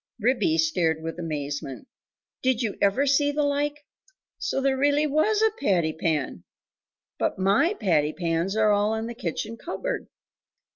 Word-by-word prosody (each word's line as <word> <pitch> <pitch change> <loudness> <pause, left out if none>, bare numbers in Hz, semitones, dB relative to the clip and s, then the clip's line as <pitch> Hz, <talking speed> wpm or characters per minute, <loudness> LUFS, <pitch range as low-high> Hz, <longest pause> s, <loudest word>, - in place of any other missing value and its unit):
Ribby 220 -8 +2
stared 160 0 +1
with 165 +1 -5
amazement 145 - -4 0.5
"Did 255 -2 +1
you 215 -3 -2
ever 200 +8 +3
see 285 +1 +3
the 295 +1 0
like! 290 +1 -1 0.5
so - - -1
there 270 0 +2
really 290 +2 +2
WAS 315 +9 +2
a 445 - +4
patty 170 -5 +1
pan?.... 150 - -2 0.8
But - - 0
my 200 - +3
patty 155 -6 +2
pans 170 +3 -1
are 215 -1 +4
all 205 +2 +2
in 220 0 -3
the 235 - -5
kitchen 220 +2 -4
cupboard. - - -4
215 Hz, 150 wpm, -25 LUFS, -, 0.8 s, a